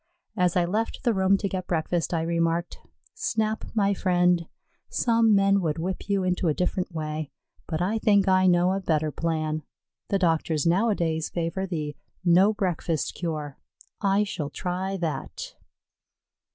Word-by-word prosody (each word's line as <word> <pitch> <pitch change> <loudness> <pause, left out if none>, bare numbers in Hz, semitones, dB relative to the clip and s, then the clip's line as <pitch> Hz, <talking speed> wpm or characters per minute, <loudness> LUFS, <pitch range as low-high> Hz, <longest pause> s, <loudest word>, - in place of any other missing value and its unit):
As 180 -4 +2
I 175 -1 +3
left 215 +6 -2
the 240 -3 +3
room 190 0 +3
to 200 - -2
get 185 -1 -4
breakfast, 170 0 -1
I 165 -2 0
remarked: 170 +1 -1 0.3
"Snap, 220 -1 -1
my 200 -2 +3
friend, 180 -3 +2 0.4
some 230 -2 +3
men 195 0 +4
would 155 -4 -1
whip 185 +5 -4
you 200 -2 +1
into 180 -1 0
a 155 - +2
different 180 +1 -1
way, 155 -2 -4 0.4
but 165 +1 -1
I 215 +5 0
think 205 -2 +3
I 185 0 +4
know 175 0 +4
a 195 - 0
better 155 -4 0
plan. 155 -1 -1 0.5
The 200 - +2
doctors 165 -3 +1
nowadays 170 -4 +1
favor 175 +3 -2
the 150 -5 -3 0.3
'no 180 +4 +6
breakfast 180 -6 -1
cure.' 155 -5 -4 0.4
I 200 +1 +3
shall 170 -8 -4
try 185 +4 -3
that." 180 - -4
180 Hz, 150 wpm, -26 LUFS, 165-195 Hz, 0.5 s, no